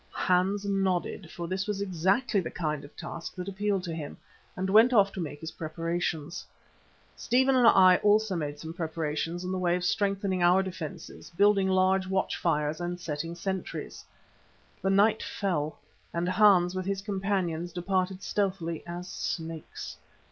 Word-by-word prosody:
Hans 190 +3 +1
nodded, 195 -2 -1
for 170 +1 -6
this 190 +2 -2
was 205 -2 -2
exactly 195 +4 +1
the 180 - -3
kind 155 -4 -3
of 145 - -13
task 165 - -7
that 180 0 -6
appealed 200 -1 -1
to 170 -3 -4
him, 155 -3 -6 0.4
and 190 +1 -1
went 220 +6 +6
off 200 -3 +5
to - - -7
make 145 -2 -6
his 160 - -5
preparations. 165 0 -3 0.7
Stephen 260 +2 +2
and 245 -2 +5
I 185 -4 +7
also 210 -1 +3
made 150 -3 -3
some 160 +2 -7
preparations 165 +1 -3
in 180 - -3
the 185 - -1
way 175 -1 +2
of 180 - -3
strengthening 195 -1 0
our 180 +2 +5
defences, 165 -5 -7
building 200 +2 +3
large 190 0 +3
watch 190 0 0
fires 150 -1 0
and 175 0 -3
setting 165 0 -4
sentries. 190 +2 -5 0.8
The 190 - 0
night 205 +3 +4
fell, 155 -7 -2 0.4
and 170 +1 0
Hans 185 -2 +5
with 185 0 -3
his 195 0 -2
companions 190 -4 -1
departed 185 +1 -1
stealthily 185 -5 -1
as 175 +1 -6
snakes. 165 -3 -5
185 Hz, 160 wpm, -28 LUFS, 170-195 Hz, 0.8 s, I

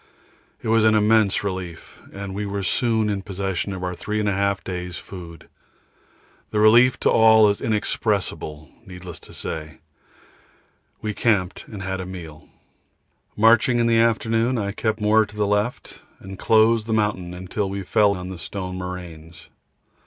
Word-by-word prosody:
It - - -4
was 115 0 +3
an 110 0 +4
immense 105 -1 +3
relief, 95 -4 -6
and 100 -1 -7
we 100 +2 -3
were 100 0 -3
soon 110 +1 +1
in 100 -2 -1
possession 95 -1 -3
of 95 -1 -6
our 90 0 -2
3 105 +4 -3
1/2 100 -1 0
days' 90 -2 -5
food. 85 -4 -10 1.0
The 105 - -1
relief 120 +4 +5
to - - +3
all 110 -1 +6
is 100 - -2
inexpressible; 100 -8 -2
needless 90 -4 -9
to - - -13
say, 75 -1 -6 1.3
we 105 -1 -2
camped 100 -5 0
and 100 -4 -8
had 95 0 -3
a 90 - -7
meal. 85 -5 -10 0.9
Marching 115 +3 +4
in 120 - +2
the 115 -1 +3
afternoon, 115 +1 +1
I 100 -2 -2
kept 110 +2 -2
more 110 +1 +4
to 105 0 -11
the 105 -1 0
left, 105 +4 -2 0.2
and 95 0 -10
closed 110 0 +3
the 110 - -1
mountain 95 -4 -2
till 100 +2 -2
we 100 0 -4
fell 105 +1 +3
on 90 0 -7
the 95 -2 -8
stone 90 0 -6
moraines. 85 -2 -9
100 Hz, 160 wpm, -22 LUFS, 90-110 Hz, 1.3 s, all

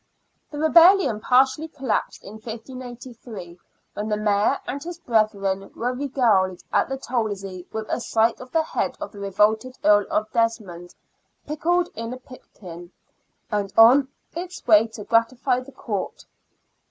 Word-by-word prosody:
The 295 - -8
rebellion 335 - +5
partially 265 +7 +3
collapsed 270 -6 -3
in 200 - -10
1583, 235 -5 -9 0.3
when 210 +1 -4
the 210 - 0
Mayor 210 +5 +1
and 280 +2 -4
his 345 0 -7
brethren 210 - 0
were 245 +2 -2
regaled 235 -9 +1
at - - +2
the 270 - -3
Tolzey 200 -8 -4
with 220 0 -4
a - - -2
sight 225 +2 +1
of 255 - -11
the 325 -1 +2
head - - -3
of - - -6
the 205 - -12
revolted 215 +5 +1
Earl 205 -1 +4
of 215 0 -1
Desmond, 210 -7 -2 0.3
" - - -47
pickled 345 +4 0
in 230 +1 -6
a - - -7
pipkin," 180 -9 -12 0.6
and 205 -2 -1
on 250 +5 +7 0.3
its 360 +1 -7
way 220 -1 +6
to 220 -1 -9
gratify 240 +3 +1
the 255 +2 -11
Court. 210 -7 -5
230 Hz, 150 wpm, -23 LUFS, 205-260 Hz, 0.6 s, on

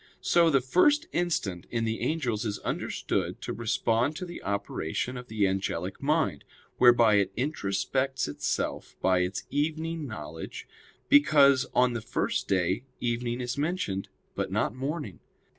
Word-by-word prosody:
So 170 -1 +4
the 135 -4 +3
first 290 - +3
instant 110 - -1
in 115 -1 -1
the 110 0 -2
angels 125 -9 -1
is 105 -3 -2
understood - - -2
to - - -3
respond 115 +4 0
to 180 - -5
the 175 -1 -8
operation 100 +3 -2
of 125 0 -7
the 105 -2 +1
angelic 95 -1 -2
mind, 150 - +1 0.4
whereby 120 -4 +6
it 100 -1 0
introspects 130 +1 -1
itself 75 - -3
by 95 -1 +3
its 90 +2 -1
evening 160 +2 -1
knowledge 80 - -7 0.4
because 140 -2 +6
on 125 -1 +4
the 120 - -3
first 110 - -1
day 95 +3 +1 0.2
evening 120 0 -1
is 125 +3 -3
mentioned, 145 - -2 0.2
but - - -3
not - - 0
morning. 135 - -4
120 Hz, 140 wpm, -28 LUFS, 100-145 Hz, 0.4 s, whereby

